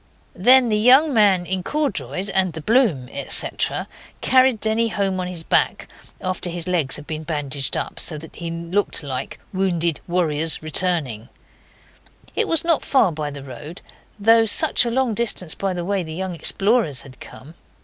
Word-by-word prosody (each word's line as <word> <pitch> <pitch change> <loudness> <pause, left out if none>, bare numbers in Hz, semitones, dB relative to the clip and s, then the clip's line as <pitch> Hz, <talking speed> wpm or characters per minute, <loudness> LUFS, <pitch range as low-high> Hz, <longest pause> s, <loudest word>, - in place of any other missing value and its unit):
Then 245 +5 +5
the 210 -1 +1
young 265 +7 +5
man 200 -5 +3
in 185 +1 -1
corduroys 220 -6 -3
and 190 -3 +1
the 160 - -7
bloom, 215 - +2
etc., - - 0 0.3
carried 255 -3 +3
Denny 220 +2 +1
home 195 -3 -2
on 180 - -3
his 175 -2 -3
back, - - 0 0.3
after 185 -1 -2
his 170 0 -3
legs 170 -7 +1
had 150 - -8
been 155 0 -5
bandaged 145 -4 -2
up, - - -5
so 155 - -1
that 160 +2 -12
he 170 -1 -5
looked 170 +3 -2
like 130 -3 -5
'wounded 175 -4 0
warriors 165 -3 0
returning'. 155 - +1 1.1
It 450 - +1
was 330 - +3
not 335 -2 +1
far 245 -9 +2
by 150 -2 -4
the 140 -1 -9
road, 145 +6 -10 0.4
though 225 +2 +5
such 215 - +4
a - - -1
long 250 -1 0
distance 210 -7 0
by 195 -1 -3
the 175 -1 -4
way 200 0 -1
the 160 -2 -7
young 190 +1 -4
explorers 195 - 0
had 130 -2 -15
come. 150 +5 -13
180 Hz, 170 wpm, -21 LUFS, 160-220 Hz, 1.1 s, Then